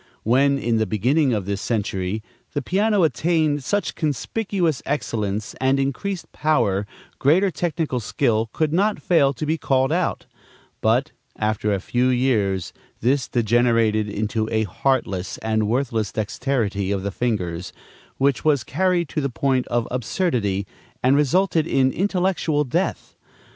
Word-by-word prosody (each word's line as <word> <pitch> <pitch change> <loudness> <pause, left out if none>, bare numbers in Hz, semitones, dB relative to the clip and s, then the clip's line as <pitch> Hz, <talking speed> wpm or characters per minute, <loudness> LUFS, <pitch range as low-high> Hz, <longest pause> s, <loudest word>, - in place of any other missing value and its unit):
When, 140 +5 +3
in 120 -4 0
the 110 -1 +1
beginning 130 - +2
of 105 -5 -1
this 100 0 -3
century, 105 -2 -2 0.3
the 145 - -1
piano 200 - +2
attained 155 +1 +1
such 205 +8 -1
conspicuous 170 - -1
excellence 110 -7 -2
and 135 +1 +3
increased 160 +8 -3
power, 105 -10 +1 0.3
greater 180 +8 +3
technical 160 -7 -2
skill 115 0 0
could 155 -1 0
not 205 +4 +2
fail 145 -6 +3
to 140 - -4
be 160 +1 0
called 135 +1 +1
out; 175 +2 -1 0.6
but, 125 +7 +2 0.3
after 105 0 0
a 100 - +1
few 125 +6 0
years, 110 -8 +1 0.3
this 130 +3 +1
degenerated 115 -2 +2
into 110 +1 -2
a 110 -1 +2
heartless 100 -3 -1
and 110 -1 0
worthless 115 -3 0
dexterity 110 -3 -1
of 100 -1 -1
the 100 - -2
fingers, 95 -6 -2 0.5
which 140 -1 +1
was 145 -5 +3
carried 180 +1 +1
to 155 - -2
the 140 - -1
point 130 0 0
of 120 -1 0
absurdity 120 - -1 0.4
and 130 +2 +4
resulted 160 +3 +2
in 130 -3 +2
intellectual 180 -5 0
death. 130 - -2
130 Hz, 140 wpm, -22 LUFS, 110-155 Hz, 0.6 s, and